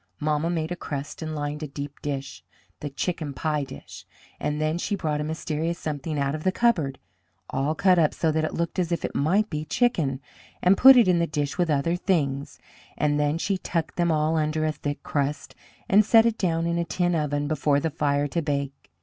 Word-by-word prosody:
Mamma 150 Hz, +2 st, 0 dB
made 165 Hz, -1 st, -2 dB
a -, -, -1 dB
crust 145 Hz, -3 st, -6 dB
and 155 Hz, -1 st, -4 dB
lined 145 Hz, +1 st, -3 dB
a 155 Hz, -, -3 dB
deep 140 Hz, 0 st, -7 dB
dish 135 Hz, -2 st, -5 dB, 0.4 s
the 145 Hz, -, -4 dB
chicken 150 Hz, 0 st, -3 dB
pie 150 Hz, -1 st, -1 dB
dish 135 Hz, -1 st, -10 dB, 0.4 s
and 150 Hz, 0 st, -2 dB
then 155 Hz, +2 st, 0 dB
she 205 Hz, -, -1 dB
brought 155 Hz, -5 st, -2 dB
a -, -, -1 dB
mysterious 160 Hz, +1 st, -2 dB
something 155 Hz, 0 st, -4 dB
out 140 Hz, 0 st, 0 dB
of 155 Hz, 0 st, -5 dB
the 185 Hz, -, +2 dB
cupboard, 180 Hz, -, +1 dB, 0.5 s
all 145 Hz, +4 st, 0 dB
cut 185 Hz, +1 st, +4 dB
up 155 Hz, -2 st, +4 dB
so 160 Hz, -, 0 dB
that 155 Hz, 0 st, 0 dB
it 155 Hz, -, -2 dB
looked 170 Hz, +2 st, -2 dB
as 175 Hz, -1 st, 0 dB
if 170 Hz, -, -1 dB
it -, -, -4 dB
might 190 Hz, +9 st, +2 dB
be 150 Hz, -1 st, -2 dB
chicken, 155 Hz, -, +1 dB, 0.4 s
and 185 Hz, +2 st, +6 dB
put 265 Hz, +4 st, +9 dB
it 235 Hz, -, +6 dB
in 180 Hz, -2 st, +4 dB
the 170 Hz, -, +1 dB
dish 145 Hz, -2 st, -2 dB
with 175 Hz, -2 st, +2 dB
other 150 Hz, +3 st, +1 dB
things, 145 Hz, -7 st, -1 dB, 0.4 s
and 150 Hz, 0 st, +1 dB
then 150 Hz, +1 st, +1 dB
she 190 Hz, +2 st, -1 dB
tucked 165 Hz, -3 st, -2 dB
them 170 Hz, -1 st, +1 dB
all 155 Hz, +1 st, +1 dB
under 155 Hz, 0 st, 0 dB
a 155 Hz, -, +1 dB
thick 145 Hz, -1 st, -5 dB
crust, 145 Hz, 0 st, -2 dB, 0.3 s
and 205 Hz, +2 st, +6 dB
set 225 Hz, +2 st, +6 dB
it 230 Hz, -1 st, +1 dB
down 165 Hz, -3 st, 0 dB
in 170 Hz, 0 st, 0 dB
a -, -, +1 dB
tin 175 Hz, +2 st, 0 dB
oven 145 Hz, -2 st, 0 dB
before 145 Hz, -1 st, +1 dB
the 160 Hz, +2 st, -2 dB
fire 145 Hz, -1 st, +1 dB
to 170 Hz, +4 st, -1 dB
bake. 140 Hz, -2 st, -3 dB
155 Hz, 220 wpm, -25 LUFS, 145-170 Hz, 0.5 s, put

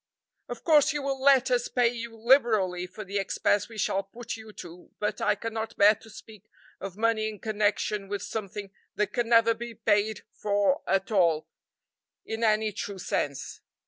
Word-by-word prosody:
"Of -, -, -7 dB
course 305 Hz, -2 st, +5 dB
you 295 Hz, -1 st, -3 dB
will 270 Hz, -1 st, -2 dB
let 265 Hz, -2 st, +5 dB
us 245 Hz, -1 st, +2 dB
pay 245 Hz, -2 st, +2 dB
you 235 Hz, -1 st, -7 dB
liberally 220 Hz, -7 st, +3 dB
for 185 Hz, +4 st, -9 dB
the 200 Hz, +1 st, -2 dB
expense 205 Hz, +1 st, 0 dB
we 225 Hz, -, -11 dB
shall 195 Hz, -1 st, 0 dB
put 225 Hz, +5 st, -7 dB
you 220 Hz, -1 st, -11 dB
to, 175 Hz, -1 st, -11 dB
but 210 Hz, -, -2 dB
I -, -, +2 dB
cannot 225 Hz, 0 st, -5 dB
bear 205 Hz, +1 st, +7 dB
to 220 Hz, -, -16 dB
speak 215 Hz, -1 st, -14 dB, 0.3 s
of 195 Hz, -1 st, -7 dB
money 220 Hz, -1 st, +1 dB
in 215 Hz, -, -8 dB
connection 210 Hz, -1 st, -1 dB
with 200 Hz, 0 st, -4 dB
something 200 Hz, -2 st, -5 dB, 0.2 s
that 210 Hz, -1 st, -1 dB
can 240 Hz, -1 st, -1 dB
never 230 Hz, -1 st, +5 dB
be 235 Hz, 0 st, -8 dB
paid 215 Hz, 0 st, +1 dB
for 205 Hz, +7 st, +1 dB
at 195 Hz, +2 st, 0 dB
all, 170 Hz, -6 st, +2 dB, 0.8 s
in 225 Hz, +1 st, -4 dB
any 215 Hz, -1 st, +2 dB
true 200 Hz, 0 st, -5 dB
sense." 140 Hz, -6 st, -3 dB
215 Hz, 175 wpm, -27 LUFS, 200-230 Hz, 0.8 s, bear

